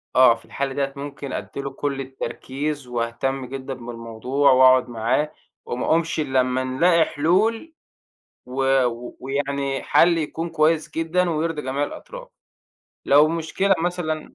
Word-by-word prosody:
آه 130 Hz, -2 st, +7 dB
في 115 Hz, -, -17 dB
الحالة 140 Hz, -1 st, -3 dB
ديَّة 140 Hz, 0 st, -2 dB
ممكن 140 Hz, -1 st, -7 dB
أدِّي 140 Hz, -, -5 dB
له 140 Hz, -, -4 dB
كل 140 Hz, 0 st, -3 dB
التركيز، 135 Hz, +1 st, -5 dB
واهتِم 125 Hz, +3 st, -2 dB
جدًا 135 Hz, +1 st, -6 dB
بالموضوع، 120 Hz, +3 st, 0 dB
وأقعد 130 Hz, -1 st, +6 dB
معاه 120 Hz, +6 st, 0 dB, 0.3 s
وما 120 Hz, -, -3 dB
أقومش 165 Hz, 0 st, +1 dB
إلا 135 Hz, -4 st, +1 dB
لمّا 130 Hz, +1 st, -1 dB
نلاقي 165 Hz, +6 st, +3 dB
حلول، 215 Hz, -, +1 dB, 0.7 s
و 135 Hz, 0 st, +2 dB
و 120 Hz, 0 st, -5 dB
ويعني 140 Hz, 0 st, -2 dB
حل 170 Hz, 0 st, +4 dB
يكون 165 Hz, +1 st, -3 dB
كويِس 160 Hz, 0 st, +1 dB
جدًا 175 Hz, +2 st, 0 dB
ويرضي 160 Hz, -1 st, -1 dB
جميع 135 Hz, +2 st, -2 dB
الأطراف. -, -, -8 dB, 0.8 s
لو 145 Hz, +2 st, +6 dB
مشكلة 170 Hz, +4 st, +1 dB
مثلًا 165 Hz, -2 st, -3 dB
140 Hz, 140 wpm, -23 LUFS, 130-160 Hz, 0.8 s, آه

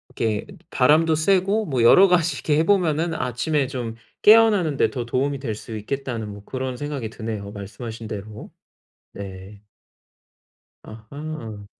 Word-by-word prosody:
이렇게 110 Hz, -2 st, -1 dB, 0.2 s
바람도 155 Hz, +5 st, +4 dB
쐬고 195 Hz, +6 st, +2 dB
뭐 130 Hz, -8 st, -1 dB
여러 190 Hz, +11 st, +8 dB
가지 175 Hz, -2 st, +2 dB
이렇게 150 Hz, -1 st, 0 dB
해 -, -, +3 dB
보면은 170 Hz, -4 st, +2 dB
아침에 135 Hz, +3 st, -1 dB
좀 120 Hz, -4 st, -5 dB, 0.3 s
깨어나는데 210 Hz, -9 st, +5 dB
더 125 Hz, -3 st, -4 dB
도움이 135 Hz, +4 st, -1 dB
될 115 Hz, -6 st, -4 dB
수 110 Hz, +1 st, -8 dB
있겠다는 115 Hz, 0 st, -4 dB
뭐 100 Hz, 0 st, -10 dB
그런 130 Hz, -1 st, -4 dB
생각이 140 Hz, -5 st, -4 dB
드네요, 110 Hz, -3 st, -6 dB
말씀하신 110 Hz, +3 st, -8 dB
대로. 105 Hz, +1 st, -8 dB, 0.6 s
네. 100 Hz, +1 st, -9 dB, 1.2 s
아하. 110 Hz, -1 st, -8 dB
130 Hz, 290 characters per minute, -23 LUFS, 110-155 Hz, 1.2 s, 여러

